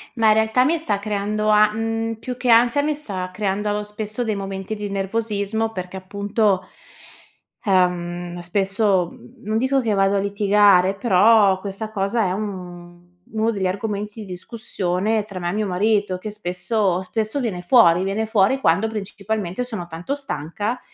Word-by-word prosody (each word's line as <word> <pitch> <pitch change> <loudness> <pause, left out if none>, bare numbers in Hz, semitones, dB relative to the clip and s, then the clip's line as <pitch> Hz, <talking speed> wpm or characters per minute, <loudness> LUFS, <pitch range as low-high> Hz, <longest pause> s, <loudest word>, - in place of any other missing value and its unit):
Ma 225 -2 +3
in - - +7
realtà, 220 +3 +3
mi 330 +4 +2
sta 230 -11 -1
creando 210 +1 -1
a 210 0 +5
mhmm, 225 +1 -2
più 245 +3 -6
che 250 - -2
ansia 235 +4 +5
mi 300 +1 0
sta 195 -11 -5
creando 210 +1 -1
spesso 210 +2 -5
dei 220 -3 -1
momenti 195 +1 -4
di 210 -1 -5
nervosismo 210 +2 -1
perché, 185 -2 -6
appunto, 200 +1 0 1.0
ehm, 175 -2 0
spesso, 195 0 +1
mhmm, 125 - -17
non 215 +1 0
dico 265 +2 +2
che 225 -3 0
vado 195 0 +2
a - - +2
litigare, 200 -1 +4
però 200 -1 +4
questa 200 +3 -6
cosa 210 +2 0
è 180 - 0
un 180 -3 -6 0.3
uno 220 +1 +1
degli 195 -4 -1
argomenti 205 +2 -4
di - - -7
discussione 195 +1 -2
tra 200 -3 -7
me 175 -1 -2
e - - -2
mio 210 0 -1
marito, 200 0 +1
che 210 +4 -6
spesso 190 -1 -1
spesso 220 +6 -2
viene 205 -8 -3
fuori. 180 -4 +5
Viene 200 +3 -1
fuori 220 +3 +2
quando, 185 +4 +3
principalmente, 205 -1 -3
sono 220 -8 -5
tanto 175 - -4
stanca 210 - -4
205 Hz, 165 wpm, -22 LUFS, 185-220 Hz, 1.0 s, in